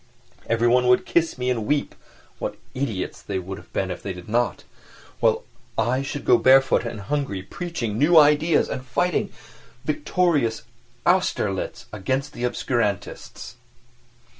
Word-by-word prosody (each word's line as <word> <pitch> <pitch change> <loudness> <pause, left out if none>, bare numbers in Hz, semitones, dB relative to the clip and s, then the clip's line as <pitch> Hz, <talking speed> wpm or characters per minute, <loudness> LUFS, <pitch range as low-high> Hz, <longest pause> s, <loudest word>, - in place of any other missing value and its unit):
Everyone 120 +2 +3
would 125 0 +4
kiss 165 -4 +1
me 125 0 0
and 115 -4 -2
weep 145 -1 0 0.5
(what - - -4 0.2
idiots 115 -9 -3
they 100 - -4
would 95 +2 -7
be - - -1
if 95 -1 -5
they 100 - -4
did 90 -1 -11
not), 120 +3 0 0.6
while - - +2 0.3
I 130 +3 +1
should 140 +1 -5
go 120 - +5
barefoot 135 +2 +5
and 115 -3 -5
hungry 100 -4 -2
preaching 115 - -4
new 160 +4 +5
ideas 150 +2 +5
and 130 - -4
fighting 170 +7 0
a - - -24 0.5
victorious 150 -5 +1 0.4
Austerlitz - - 0
against 135 +9 -2
the 120 - -3
obscurantists. 120 -5 -3
125 Hz, 140 wpm, -24 LUFS, 110-145 Hz, 0.6 s, go